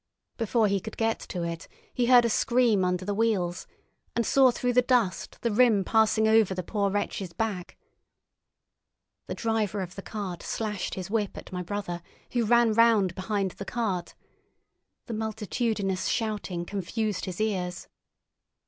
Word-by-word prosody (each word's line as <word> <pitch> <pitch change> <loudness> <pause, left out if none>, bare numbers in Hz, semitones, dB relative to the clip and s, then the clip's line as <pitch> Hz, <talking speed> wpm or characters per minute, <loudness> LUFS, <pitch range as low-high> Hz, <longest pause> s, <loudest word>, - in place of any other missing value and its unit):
Before 230 -1 +2
he 200 0 +1
could 220 +4 -9
get 225 0 +1
to 175 -2 -5
it, 170 0 -5 0.3
he 245 -1 +1
heard 245 -1 +7
a - - +2
scream 235 -6 +3
under 180 0 0
the 205 - -1
wheels, 200 -5 0 0.5
and 235 - +1
saw 265 +2 +5
through 245 0 0
the 250 - +5
dust 245 -7 0
the 235 - 0
rim 220 -3 +4
passing 220 +1 +3
over 220 -3 +4
the 185 - -3
poor 200 +2 0
wretch's 195 -2 -3
back. 195 -2 -3 1.5
The - - -4
driver 220 -3 -1
of 180 -2 -4
the 195 - -7
cart 195 -4 -5
slashed 210 -4 -3
his 185 0 -6
whip 215 -3 -1
at - - -9
my 180 -1 -3
brother, 180 -1 -4 0.3
who 240 -2 +1
ran 235 0 +4
round 220 -5 +4
behind 195 0 -1
the 200 - -8
cart. 200 -6 -2 0.9
The 235 - -5
multitudinous 215 -3 -1
shouting 205 -6 -2
confused 205 +2 -2
his 185 0 -6
ears. 185 -5 -2
210 Hz, 155 wpm, -27 LUFS, 185-225 Hz, 1.5 s, heard